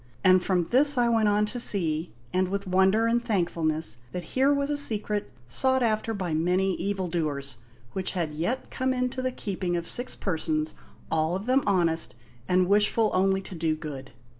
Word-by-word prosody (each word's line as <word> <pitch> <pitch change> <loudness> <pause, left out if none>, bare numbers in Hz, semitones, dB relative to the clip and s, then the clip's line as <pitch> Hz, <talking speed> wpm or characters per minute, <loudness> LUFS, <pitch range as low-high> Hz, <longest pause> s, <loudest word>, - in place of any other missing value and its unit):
And 185 -1 +5
from 180 -2 +1
this 270 - +3
I 240 -1 +3
went 225 -2 +2
on 210 +1 +2
to 220 +4 -5
see, 165 -7 +2 0.2
and 185 0 +1
with 200 +2 -3
wonder 190 +4 +2
and 235 +1 +1
thankfulness, 165 - -1 0.2
that 180 - -4
here 265 +2 +3
was 280 0 0
a - - 0
secret, 210 - +3 0.2
sought 260 - +3
after 220 0 0
by 180 -5 -3
many 180 +4 +1
evildoers, 165 -9 -3 0.3
which 190 -1 -4
had 165 -5 -3
yet 175 +12 -3
come 260 0 -1
into 250 0 -2
the 255 0 -1
keeping 185 -6 -3
of 170 - -5
six 245 +1 0
persons, 155 -4 -2 0.4
all 160 +2 0
of 195 +2 -5
them 260 +2 +2
honest, 170 -7 +2 0.3
and 180 0 +3
wishful 210 +2 +2
only 190 +1 +2
to 190 - -10
do 160 -2 -1
good. 145 -4 -8
190 Hz, 180 wpm, -26 LUFS, 165-230 Hz, 0.4 s, And